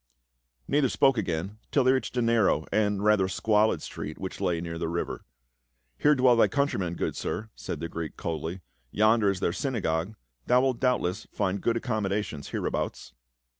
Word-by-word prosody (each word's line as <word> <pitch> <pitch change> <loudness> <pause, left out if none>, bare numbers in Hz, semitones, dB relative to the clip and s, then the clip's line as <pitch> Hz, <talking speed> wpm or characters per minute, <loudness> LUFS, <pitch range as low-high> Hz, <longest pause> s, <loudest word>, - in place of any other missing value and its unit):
Neither 140 -2 +2
spoke 135 -1 +3
again 95 +2 -3
till 140 - +3
they 130 - +5
reached 130 -1 -1
a 120 - +2
narrow 115 -9 +3
and 105 -2 +1
rather 105 -3 +4
squalid 105 +3 +2
street 75 +1 -6
which 95 -1 -6
lay 85 -2 +1
near 85 0 -5
the 85 - -1
river. 85 +1 -3 0.4
" - - -48
Here 150 0 +5
dwell 125 -2 +5
thy 115 - +5
countrymen, 100 - -1
good - - -2
sir," 110 0 -4
said 80 - -6
the 85 - -3
Greek 80 -2 -6
coldly. 85 +3 -4 0.2
" 60 - -42
Yonder 110 0 +4
is 95 -2 -2
their 85 - +1
synagogue; 95 -5 -1 0.3
thou 125 0 +5
wilt 130 -2 0
doubtless 125 -9 0
find 100 -1 -1
good 115 0 +1
accommodations 105 - -2
hereabouts." - - -3
100 Hz, 175 wpm, -27 LUFS, 85-115 Hz, 0.4 s, they